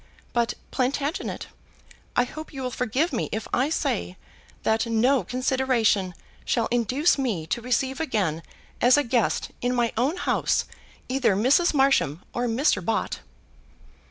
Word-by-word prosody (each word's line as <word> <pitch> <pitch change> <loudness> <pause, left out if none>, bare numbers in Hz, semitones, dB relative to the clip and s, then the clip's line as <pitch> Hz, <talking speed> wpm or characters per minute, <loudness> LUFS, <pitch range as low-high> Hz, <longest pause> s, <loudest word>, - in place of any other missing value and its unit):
But, 235 0 +1 0.2
Plantagenet, 280 +5 -2 0.7
I 245 - +4
hope 310 +5 -8
you 270 -3 -6
will 250 - -2
forgive 255 - 0
me 235 - -1
if 220 - -3
I 260 +4 +2
say 90 - -1 0.5
that 220 +1 +1
no 245 +4 +3
consideration 250 -8 +1 0.3
shall 230 -2 +1
induce 255 +7 +2
me 215 -12 -1
to 200 +9 -2
receive 260 +2 0
again 200 - -1 0.4
as 250 +3 +6
a 290 - +3
guest, 235 -3 0
in 245 +1 0
my 240 -2 +1
own 275 +10 +1
house, - - +1 0.4
either 255 -6 +2
Mrs. 280 - +3
Marsham 265 - +2
or 245 0 -1
Mr. 230 - +1
Bott." 225 - -1
245 Hz, 140 wpm, -25 LUFS, 225-270 Hz, 0.7 s, as